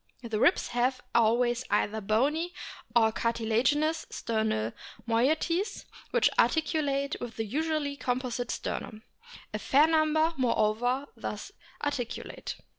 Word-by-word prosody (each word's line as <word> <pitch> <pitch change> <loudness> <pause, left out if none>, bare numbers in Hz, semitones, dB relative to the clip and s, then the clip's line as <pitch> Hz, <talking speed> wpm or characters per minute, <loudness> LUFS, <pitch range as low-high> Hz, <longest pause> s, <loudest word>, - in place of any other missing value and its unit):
The 225 -2 -2
ribs - - +3
have 250 +2 +1
always 240 +2 +3
either 210 +1 +1
bony 285 - +1 0.4
or 225 -2 +5
cartilaginous 235 +8 +1
sternal 220 - -1 0.3
moieties, 310 - +1 0.2
which 485 - +3
articulate 285 -4 +1
with 240 -2 -6
the 225 - -2
usually 295 +3 -1
composite 245 -2 -2
sternum. 215 0 -4 0.5
A 215 - -2
fair 280 +7 +5
number, 315 0 +3
moreover, 245 +2 +1
thus - - -6 0.3
articulate. 265 -5 -4
250 Hz, 110 wpm, -29 LUFS, 225-305 Hz, 0.5 s, or